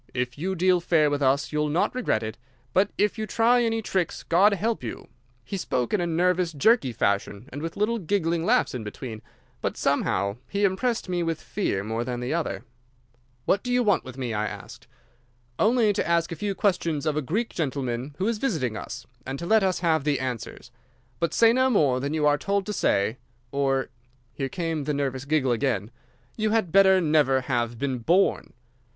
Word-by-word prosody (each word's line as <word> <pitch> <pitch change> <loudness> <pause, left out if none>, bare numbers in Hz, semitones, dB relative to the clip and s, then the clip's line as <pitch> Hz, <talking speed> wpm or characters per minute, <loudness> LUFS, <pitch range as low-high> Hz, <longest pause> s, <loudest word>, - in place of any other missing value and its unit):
If 125 -1 -2
you 185 +6 -2
deal 180 0 +3
fair 160 -4 +2
with 145 0 -1
us 140 +1 +2
you'll 150 0 0
not 160 +5 +1
regret 250 - 0
it, 110 0 -5 0.4
but 190 +2 +3
if 210 +2 +1
you 215 - -2
try 235 +3 +3
any 225 -1 0
tricks, 185 -5 -2
God 190 +5 +4
help 220 - -1
you!' 115 - -6 0.4
He 195 - -4
spoke 125 - -2
in 205 - +2
a 175 - 0
nervous, 175 +1 +1
jerky 150 - +3
fashion, 100 +1 -1
and 145 - -5
with 165 0 -5
little 220 +3 +1
giggling 170 -3 0
laughs - - +2
in 125 -3 -4
between, 110 +1 -7 0.4
but - - -2
somehow 100 +2 0
he 200 +1 -1
impressed 205 +5 0
me 180 -1 -1
with 165 -2 -1
fear 100 - -2
more 110 +2 -2
than 120 0 -4
the 125 +4 -2
other. 115 - -2 0.8
"'What 200 - +2
do 250 - -4
you 245 0 +3
want 205 -5 +2
with 130 0 -10
me?' 125 -3 -3
I 105 0 -1
asked. 105 -1 -9 0.7
"'Only 220 -1 +3
to - - -1
ask 170 0 +1
a - - -3
few 200 +4 -3
questions 170 -7 0
of 155 -2 0
a 150 - 0
Greek 210 - -1
gentleman 135 -3 -3
who 190 - 0
is 230 -2 -1
visiting 155 - -1
us, - - -7 0.2
and 135 +1 -5
to 170 - -6
let 220 +4 +4
us 185 -2 0
have 160 -4 +2
the 145 -1 +1
answers. 125 -3 -5 0.5
But 170 -2 0
say 230 +4 +5
no 260 +1 +3
more 145 - +3
than 140 +4 -2
you 155 -1 +1
are 145 0 +3
told 200 +4 0
to 210 - -3
say, 110 - +1 0.3
or'—here 135 -1 -3
came 165 -4 -3
the 150 0 -1
nervous 135 -1 -2
giggle 145 -3 +1
again—'you 120 - -3
had 215 -6 +1
better 190 0 +6
never 150 -5 +3
have 120 -3 -1
been 130 0 -2
born. 175 +11 +1
155 Hz, 195 wpm, -25 LUFS, 130-195 Hz, 0.8 s, better